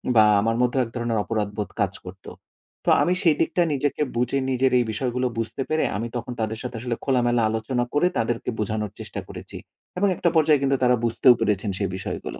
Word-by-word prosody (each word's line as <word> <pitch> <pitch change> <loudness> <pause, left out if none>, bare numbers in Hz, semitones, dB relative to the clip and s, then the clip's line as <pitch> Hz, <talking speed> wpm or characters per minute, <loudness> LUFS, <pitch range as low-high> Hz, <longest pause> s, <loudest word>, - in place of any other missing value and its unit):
বা 110 - +8 0.2
আমার 115 +2 +1
মধ্যেও 125 +1 +2
এক - - -10
ধরনের 120 -2 -1
অপরাধবোধ 105 0 -3
কাজ 100 -1 +1
করতো। 95 +1 -10 0.6
তো - - +2
আমি 180 - +2
সেই 165 -5 +4
দিকটা 170 +2 +1
নিজেকে 145 +1 -1
বুঝে 120 +3 0
নিজের 130 0 +2
এই 120 - +1
বিষয়গুলো 125 +3 -1
বুঝতে 115 +3 -3
পেরে 155 0 +1
আমি 115 +3 -3
তখন 120 +1 -5
তাদের 110 0 -2
সাথে 125 - -5
আসলে 120 0 -2
খোলামেলা 120 -3 +2
আলোচনা 110 +3 -1
করে 145 +5 +3
তাদেরকে 115 0 -1
বোঝানোর 105 -1 -2
চেষ্টা - - -6
করেছি - - -8 0.4
এবং 200 +3 +3
একটা 170 - +1
পর্যায়ে 155 -3 +4
কিন্তু 135 0 +2
তারা 125 0 +5
বুঝতেও 120 +2 +5
পেরেছেন 105 -2 0
সেই 100 -3 -1
বিষয়গুলো। 95 - -6
120 Hz, 195 wpm, -24 LUFS, 110-130 Hz, 0.6 s, বা